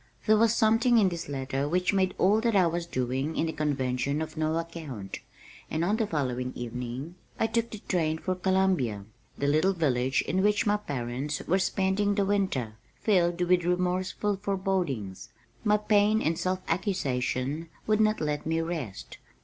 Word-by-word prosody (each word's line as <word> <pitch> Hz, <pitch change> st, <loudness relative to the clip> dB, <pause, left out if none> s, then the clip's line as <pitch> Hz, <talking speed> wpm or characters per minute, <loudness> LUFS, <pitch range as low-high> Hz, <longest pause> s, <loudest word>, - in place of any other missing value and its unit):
There 215 Hz, -, +5 dB
was 225 Hz, +1 st, +4 dB
something 230 Hz, +2 st, +4 dB
in 200 Hz, -4 st, +5 dB
this 170 Hz, -4 st, -6 dB
letter 135 Hz, +1 st, -2 dB
which 180 Hz, +4 st, +1 dB
made 190 Hz, -1 st, +1 dB
all 205 Hz, +4 st, +4 dB
that 230 Hz, -2 st, +1 dB
I 190 Hz, -2 st, +5 dB
was 170 Hz, 0 st, -1 dB
doing 130 Hz, +2 st, -2 dB
in -, -, +2 dB
the 160 Hz, -, -2 dB
convention 140 Hz, -1 st, -1 dB
of 160 Hz, -, -5 dB
no 155 Hz, +1 st, 0 dB
account, 155 Hz, -, -6 dB, 0.5 s
and 160 Hz, +2 st, 0 dB
on 205 Hz, +4 st, +1 dB
the 220 Hz, -2 st, 0 dB
following 125 Hz, -6 st, -2 dB
evening 125 Hz, +5 st, -5 dB, 0.3 s
I -, -, +3 dB
took 230 Hz, +1 st, 0 dB
the 215 Hz, -, -9 dB
train 160 Hz, -4 st, +1 dB
for 185 Hz, +3 st, -2 dB
Columbia, 185 Hz, -, +1 dB, 0.3 s
the 140 Hz, -, -1 dB
little 155 Hz, +7 st, +3 dB
village 130 Hz, -6 st, +1 dB
in 185 Hz, +5 st, 0 dB
which 205 Hz, +1 st, +2 dB
my 210 Hz, 0 st, +3 dB
parents 140 Hz, -4 st, -3 dB
were 190 Hz, +3 st, +2 dB
spending 195 Hz, +2 st, +1 dB
the 200 Hz, -1 st, +2 dB
winter, 185 Hz, -, -1 dB, 0.2 s
filled 175 Hz, -4 st, +1 dB
with 175 Hz, 0 st, +3 dB
remorseful 180 Hz, +3 st, 0 dB
forebodings. 185 Hz, -, -2 dB, 0.3 s
My 210 Hz, -1 st, +4 dB
pain 210 Hz, 0 st, +3 dB
and 165 Hz, -5 st, 0 dB
self 185 Hz, +2 st, -1 dB
accusation 155 Hz, -, -1 dB, 0.2 s
would 215 Hz, 0 st, +2 dB
not 215 Hz, 0 st, +2 dB
let 150 Hz, -1 st, -1 dB
me 165 Hz, 0 st, +1 dB
rest. 165 Hz, -, -5 dB
170 Hz, 170 wpm, -28 LUFS, 140-195 Hz, 0.5 s, There